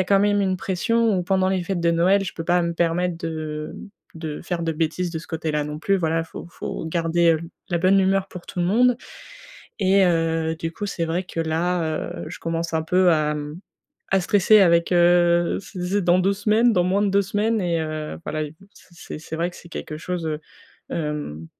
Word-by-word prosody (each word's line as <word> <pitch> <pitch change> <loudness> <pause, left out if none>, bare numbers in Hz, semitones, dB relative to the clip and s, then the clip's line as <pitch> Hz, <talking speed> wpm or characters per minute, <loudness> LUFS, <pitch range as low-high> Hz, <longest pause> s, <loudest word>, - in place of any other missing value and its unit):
a - - -5
quand 195 +1 +4
même 205 0 +3
une 190 -1 +1
pression 215 +4 +1
où - - -1
pendant 190 0 +2
les 190 -1 0
fêtes 190 0 -2
de 170 0 +3
Noël, 190 +4 +3
je 175 - -6
peux 165 - -4
pas 175 +1 +2
me 170 0 -1
permettre 170 +1 0
de 155 -2 -5 0.4
de 160 -2 -5
faire 170 -1 -3
de 165 - 0
bêtises 165 +3 -1
de 160 - -3
ce - - -13
côté-là 160 -2 -1
non 150 0 -5
plus. 195 +4 +1
Voilà, 165 -1 0
faut 165 - -9
faut - - -6
garder, 165 0 +2
heu, - - -1
l 170 - -8 0.2
la 170 - +1
bonne 190 +3 +4
humeur 190 0 +2
pour 180 -2 -10
tout - - -8
le - - +2
monde 245 +5 +4 0.8
et 195 0 +4
heu, 165 -1 +1
du 165 0 -4
coup 205 +5 -5
c'est 180 -4 -2
vrai 170 +3 -1
que 170 - -9
là, 165 +2 0 0.4
heu, - - -10
je - - -8
commence 165 0 -2
un 160 - +1
peu 180 +2 +3
à, 150 -1 +1
mmh, 150 +3 -6 0.5
à 195 - +4
stresser 205 +3 +5
avec, 170 -1 +4
heu 175 0 +4
c'est 185 0 -9
c'est 195 +3 0
dans 175 +1 +4
2 195 +2 +2
semaines, 215 +4 +3
dans 180 - +3
moins 190 +3 +1
de 205 - +2
2 200 +1 +3
semaines 210 +3 0
et 170 -2 0
heu, 155 -1 -4
voilà 155 0 -2
et 150 - -7
v 195 - -18
c 170 -3 -11
c'est 160 0 -6
vrai 170 +2 0
que - - -14
c'est 170 - -14
quelque 155 - -6
chose, 175 0 -4
heu, 155 -1 -2 0.5
hem, 150 - -4
175 Hz, 230 wpm, -23 LUFS, 165-190 Hz, 0.8 s, stresser